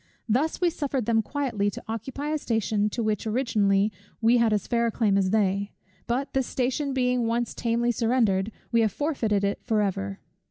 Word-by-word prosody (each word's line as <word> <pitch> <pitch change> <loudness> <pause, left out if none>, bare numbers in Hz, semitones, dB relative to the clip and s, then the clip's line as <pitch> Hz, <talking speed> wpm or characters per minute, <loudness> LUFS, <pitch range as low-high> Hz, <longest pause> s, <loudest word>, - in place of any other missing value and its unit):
Thus 265 +8 +1
we 355 -2 +2
suffered 275 -6 -2
them 225 0 +3
quietly 230 -5 -1
to - - -8
occupy 265 +6 -4
a 310 0 0
station 215 -4 0
to 230 +2 -3
which 215 0 -1
originally 210 -4 +2 0.3
we 230 +2 +4
had 230 -2 +3
as 210 -2 0
fair 235 0 +1
a - - 0
claim 210 -3 +2
as 195 -1 +2
they; 200 -1 +1 0.3
but, 255 +4 -1
this 265 -2 +1
station 265 +3 -1
being 250 -2 +1
once 235 0 -1
tamely 235 +1 0
surrendered, 225 -4 +1 0.2
we 230 -1 +4
have 220 -2 +2
forfeited 225 - 0
it 200 0 0
for 220 -3 0
ever. 100 - -3
230 Hz, 190 wpm, -26 LUFS, 210-250 Hz, 0.3 s, we